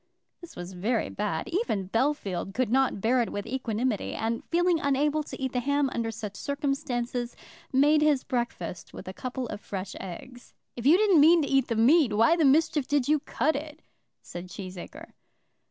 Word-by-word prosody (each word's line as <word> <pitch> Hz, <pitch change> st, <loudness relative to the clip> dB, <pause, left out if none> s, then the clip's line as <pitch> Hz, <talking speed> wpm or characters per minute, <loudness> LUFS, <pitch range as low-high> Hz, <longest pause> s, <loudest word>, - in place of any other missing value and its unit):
This 345 Hz, -1 st, -12 dB
was 175 Hz, +1 st, -7 dB
very 215 Hz, +6 st, -1 dB
bad. 210 Hz, 0 st, -3 dB
Even 220 Hz, -, -2 dB
Bellfield 210 Hz, -6 st, -1 dB
could 255 Hz, -3 st, 0 dB
not 265 Hz, -5 st, +2 dB
bear 245 Hz, +4 st, +3 dB
it 235 Hz, -, -2 dB
with 205 Hz, -, -4 dB
equanimity, 240 Hz, -3 st, -2 dB
and 230 Hz, +1 st, -2 dB
feeling 350 Hz, 0 st, +2 dB
unable 290 Hz, +2 st, +1 dB
to 300 Hz, -, -8 dB
eat 265 Hz, -2 st, -2 dB
the 250 Hz, -, +1 dB
ham 285 Hz, +1 st, +1 dB
under 230 Hz, -1 st, -2 dB
such 215 Hz, -2 st, -6 dB
circumstances, 270 Hz, -4 st, -2 dB, 0.4 s
made 295 Hz, +3 st, +4 dB
his 295 Hz, -3 st, +3 dB
breakfast 185 Hz, -, -4 dB
with -, -, -9 dB
a 185 Hz, -, -5 dB
couple 255 Hz, +4 st, -5 dB
of 205 Hz, -, -6 dB
fresh 190 Hz, -1 st, -6 dB
eggs. 245 Hz, +7 st, -10 dB, 0.2 s
"If 240 Hz, +2 st, -2 dB
you 325 Hz, +5 st, +7 dB
didn't 395 Hz, -7 st, +5 dB
mean 325 Hz, +2 st, +6 dB
to -, -, -2 dB
eat 270 Hz, -2 st, +2 dB
the 230 Hz, -, -1 dB
meat, 250 Hz, +2 st, +4 dB
why 230 Hz, +11 st, +4 dB
the 325 Hz, -3 st, +2 dB
mischief 295 Hz, 0 st, +3 dB
did 285 Hz, -3 st, +1 dB
you 305 Hz, 0 st, +3 dB
cut 295 Hz, +3 st, 0 dB
it?" 300 Hz, +2 st, -7 dB, 0.4 s
said 175 Hz, +1 st, -8 dB
Cheesacre. 190 Hz, -, -9 dB
255 Hz, 185 wpm, -27 LUFS, 220-295 Hz, 0.4 s, you